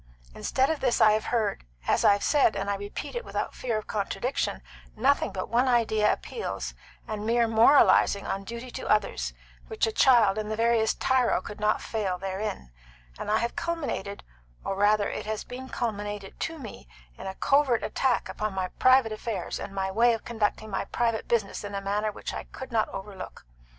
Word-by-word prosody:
Instead 265 Hz, -, +1 dB
of 315 Hz, -, -2 dB
this 250 Hz, -3 st, +1 dB
I 215 Hz, -, +7 dB
have 215 Hz, +1 st, 0 dB
heard, 215 Hz, -4 st, 0 dB, 0.2 s
as -, -, +2 dB
I -, -, +7 dB
have 200 Hz, -, -2 dB
said 285 Hz, -8 st, +3 dB
and 200 Hz, 0 st, -1 dB
I -, -, 0 dB
repeat 205 Hz, +1 st, -6 dB
it 480 Hz, -, -3 dB
without -, -, -3 dB
fear 235 Hz, -4 st, -2 dB
of 215 Hz, -, -5 dB
contradiction 215 Hz, +5 st, -2 dB, 0.3 s
nothing 270 Hz, +6 st, +2 dB
but 185 Hz, -, -4 dB
one 240 Hz, +4 st, +2 dB
idea 220 Hz, -3 st, +3 dB
appeals 455 Hz, -, -4 dB, 0.3 s
and 215 Hz, -1 st, -4 dB
mere 235 Hz, +1 st, +2 dB
moralisings 225 Hz, -3 st, +5 dB
upon 195 Hz, 0 st, -3 dB
duty 235 Hz, +3 st, -7 dB
to -, -, -6 dB
others, 65 Hz, -, +1 dB, 0.3 s
which -, -, 0 dB
a 225 Hz, -, -1 dB
child 220 Hz, -4 st, +5 dB
and 215 Hz, 0 st, -4 dB
the 215 Hz, -, -1 dB
veriest 225 Hz, -1 st, +2 dB
tyro 260 Hz, -2 st, +2 dB
could 210 Hz, -, -9 dB
not 210 Hz, 0 st, +1 dB
fail 200 Hz, -5 st, -2 dB
therein; 190 Hz, -, -4 dB, 0.5 s
and -, -, -4 dB
I 215 Hz, -, +3 dB
have 235 Hz, +1 st, -2 dB
culminated 330 Hz, -, -3 dB, 0.4 s
or 195 Hz, -, -1 dB
rather 205 Hz, +1 st, +3 dB
it -, -, -5 dB
has 215 Hz, -1 st, -3 dB
been 260 Hz, +1 st, -8 dB
culminated 205 Hz, -3 st, -4 dB
to 325 Hz, -, -3 dB
me 225 Hz, -, -10 dB, 0.3 s
in -, -, -8 dB
a 190 Hz, -, -5 dB
covert 275 Hz, -2 st, +2 dB
attack 260 Hz, -3 st, 0 dB
upon 215 Hz, -2 st, -3 dB
my 185 Hz, -1 st, -1 dB
private 255 Hz, -3 st, +5 dB
affairs 215 Hz, 0 st, -4 dB
and -, -, -6 dB
my 190 Hz, -1 st, -2 dB
way 235 Hz, +4 st, +4 dB
of 225 Hz, -, -10 dB
conducting 220 Hz, -1 st, -1 dB
my 195 Hz, -, -1 dB
private 230 Hz, -2 st, -1 dB
business 215 Hz, -4 st, 0 dB
in 205 Hz, 0 st, -5 dB
a -, -, -1 dB
manner 205 Hz, +2 st, -1 dB
which -, -, -6 dB
I -, -, -5 dB
could 260 Hz, 0 st, -9 dB
not 225 Hz, -2 st, +1 dB
overlook. 195 Hz, -, -8 dB
215 Hz, 195 wpm, -27 LUFS, 200-240 Hz, 0.5 s, I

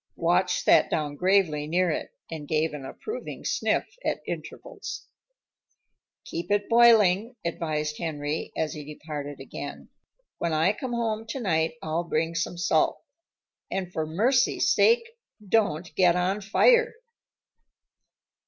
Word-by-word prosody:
Watch -, -, +1 dB
sat -, -, +5 dB
down 150 Hz, -2 st, -1 dB
gravely 180 Hz, -4 st, +2 dB
near 175 Hz, +2 st, +2 dB
it, -, -, -3 dB, 0.2 s
and 155 Hz, -3 st, -6 dB
gave 155 Hz, 0 st, 0 dB
an 140 Hz, -3 st, -7 dB
approving 445 Hz, -, -7 dB
sniff -, -, +1 dB, 0.2 s
at -, -, -1 dB
intervals. 420 Hz, +1 st, -7 dB, 1.2 s
"Keep 170 Hz, +1 st, -5 dB
it 205 Hz, 0 st, +1 dB
boiling," 230 Hz, -2 st, +5 dB
advised 155 Hz, -2 st, -2 dB
Henry 150 Hz, -2 st, -3 dB
as 155 Hz, -2 st, -1 dB
he 150 Hz, -, -7 dB
departed 145 Hz, -1 st, -7 dB
again. 135 Hz, -, -8 dB, 0.5 s
"When 170 Hz, -2 st, -1 dB
I 160 Hz, +6 st, +3 dB
come 250 Hz, +2 st, -5 dB
home 225 Hz, -2 st, -2 dB
tonight 165 Hz, -10 st, 0 dB
I'll 160 Hz, +2 st, -1 dB
bring 165 Hz, 0 st, -1 dB
some 165 Hz, +1 st, -2 dB
salt. 160 Hz, -2 st, +2 dB, 0.7 s
And 185 Hz, -2 st, -3 dB
for 155 Hz, -1 st, -2 dB
mercy's 240 Hz, -, +2 dB
sake, 465 Hz, 0 st, +4 dB, 0.4 s
don't 185 Hz, -6 st, +1 dB
get 180 Hz, -2 st, +4 dB
on 185 Hz, +3 st, 0 dB
fire." 470 Hz, -, +4 dB
170 Hz, 125 wpm, -26 LUFS, 155-215 Hz, 1.2 s, sat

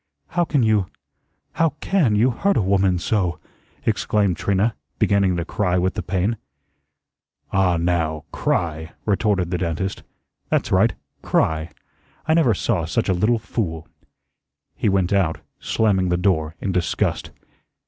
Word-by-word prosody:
"How 175 Hz, -, +1 dB
can 145 Hz, -6 st, +1 dB
you 105 Hz, -4 st, +2 dB, 0.6 s
how 165 Hz, -3 st, +1 dB
CAN 160 Hz, -, +2 dB
you 120 Hz, +5 st, +3 dB
hurt 195 Hz, +11 st, +1 dB
a -, -, +3 dB
woman 95 Hz, -1 st, +2 dB
so!" 90 Hz, -3 st, 0 dB, 0.5 s
exclaimed 100 Hz, -4 st, +1 dB
Trina, 100 Hz, +5 st, +1 dB, 0.2 s
beginning 100 Hz, -3 st, +2 dB
to 85 Hz, -, -2 dB
cry 90 Hz, -2 st, 0 dB
with 90 Hz, +1 st, +1 dB
the -, -, -3 dB
pain. 95 Hz, +5 st, -1 dB, 1.2 s
"Ah, 95 Hz, -3 st, +3 dB
now, 80 Hz, -2 st, -1 dB
CRY," 80 Hz, -1 st, -1 dB
retorted 100 Hz, -4 st, +1 dB
the 90 Hz, -, -1 dB
dentist. 90 Hz, +2 st, -2 dB, 0.5 s
"That's -, -, 0 dB
right, -, -, +3 dB, 0.3 s
CRY. 80 Hz, +1 st, 0 dB, 0.6 s
I 160 Hz, -, +4 dB
never 150 Hz, -, +4 dB
saw -, -, 0 dB
such -, -, -1 dB
a -, -, +4 dB
little 105 Hz, +7 st, +2 dB
fool." 85 Hz, -7 st, -4 dB, 0.9 s
He -, -, +1 dB
went 95 Hz, -1 st, +1 dB
out, 95 Hz, -5 st, +1 dB, 0.2 s
slamming 95 Hz, -5 st, +1 dB
the 90 Hz, -, +2 dB
door 85 Hz, -4 st, 0 dB
in 100 Hz, -, -2 dB
disgust. 90 Hz, -2 st, -1 dB
95 Hz, 140 wpm, -22 LUFS, 85-105 Hz, 1.2 s, I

